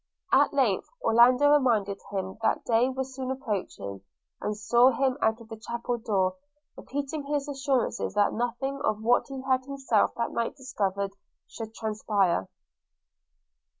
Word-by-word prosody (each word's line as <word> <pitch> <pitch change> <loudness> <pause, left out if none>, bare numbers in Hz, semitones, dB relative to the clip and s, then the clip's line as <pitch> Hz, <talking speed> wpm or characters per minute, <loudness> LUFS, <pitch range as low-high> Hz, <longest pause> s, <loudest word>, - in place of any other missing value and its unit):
At - - +5
length - - +1 0.2
Orlando 250 - +5
reminded 220 -9 +2
him 190 0 -4
that 225 - +1
day 235 +2 +3
was 265 0 -4
soon 260 0 -4
approaching, 200 - -4 0.4
and 210 0 -2
saw 240 +4 +5
him 265 0 +1
out 220 +1 +2
of 230 - -13
the 225 - -7
chapel 235 +1 -3
door, 200 -1 0 0.4
repeating 285 +2 -4
his 290 0 -1
assurances 270 -6 -1
that 205 0 +3
nothing 245 +4 -2
of 215 0 0
what 240 +2 +3
he 270 -2 -7
had 260 -1 +1
himself 265 -5 0
that 235 - -2
night 230 0 -2
discovered 200 -7 -2 0.3
should 225 -1 -8
transpire. 210 - 0
235 Hz, 145 wpm, -27 LUFS, 210-265 Hz, 0.4 s, At